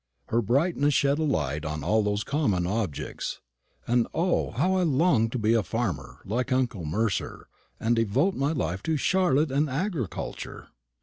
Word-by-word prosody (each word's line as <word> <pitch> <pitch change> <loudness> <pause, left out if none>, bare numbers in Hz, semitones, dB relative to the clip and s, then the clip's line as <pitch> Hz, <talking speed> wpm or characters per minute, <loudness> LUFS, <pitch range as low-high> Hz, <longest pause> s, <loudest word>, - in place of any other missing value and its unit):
Her 115 - +2
brightness 145 - +2
shed 140 +2 +2
a - - +1
light 75 - -1
on 75 -1 -4
all 110 +7 +3
those 105 0 0
common 105 - 0
objects; 100 -5 -3 0.5
and 120 -1 +2
O, 175 +2 +1
how 185 +1 +1
I - - +2
longed 140 -8 +3
to - - 0
be 110 0 +2
a 115 - +4
farmer, 95 - -3
like 125 +6 -2
uncle 120 -9 0
Mercer, 105 +6 -2 0.3
and 115 +2 +2
devote 115 - +2
my 140 -1 0
life 95 - -2
to 160 +5 0
Charlotte 160 -3 +2
and 145 +2 +1
agriculture! 150 - -4
120 Hz, 165 wpm, -27 LUFS, 105-150 Hz, 0.5 s, a